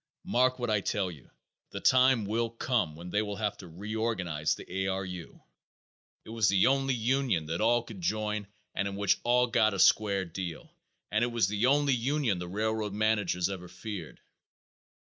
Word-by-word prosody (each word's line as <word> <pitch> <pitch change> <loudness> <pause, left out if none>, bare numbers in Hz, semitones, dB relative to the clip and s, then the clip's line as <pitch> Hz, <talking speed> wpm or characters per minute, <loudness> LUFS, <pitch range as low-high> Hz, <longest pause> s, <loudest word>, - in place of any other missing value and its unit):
Mark 130 +1 +2
what 120 -3 -2
I 105 -2 +2
tell 95 -2 -1
you, 75 -7 -14 0.4
the - - -6
time 130 -3 +4
will 115 +3 0
come 115 - -1
when 85 +2 -9
they 105 - +2
will 105 -1 -4
have 105 0 -2
to 95 - -11
reorganize 95 -4 -2
the - - -10
A. 95 +1 -2
R. 95 0 -1
U. 90 -3 -9 0.8
It - - -9
was 115 -2 +2
the 95 -1 +4
only 135 0 +2
union 120 - +1
that 80 +4 -3
all 120 +1 +3
could 110 -5 -10
join 105 +2 -1 0.3
and 100 - -1
in 100 - -5
which 100 -1 +2
all 125 +1 +4
got 110 -3 +2
a - - -4
square 100 0 +4
deal, 85 -1 -7 0.4
and 110 +3 +2
it - - +2
was 115 -5 +2
the 105 +4 +1
only 140 0 +3
union 125 -4 0
the 90 - -5
railroad 105 +2 -2
managers 105 -4 +1
ever 95 -2 -6
feared." 105 +3 -8
105 Hz, 185 wpm, -29 LUFS, 95-115 Hz, 0.8 s, time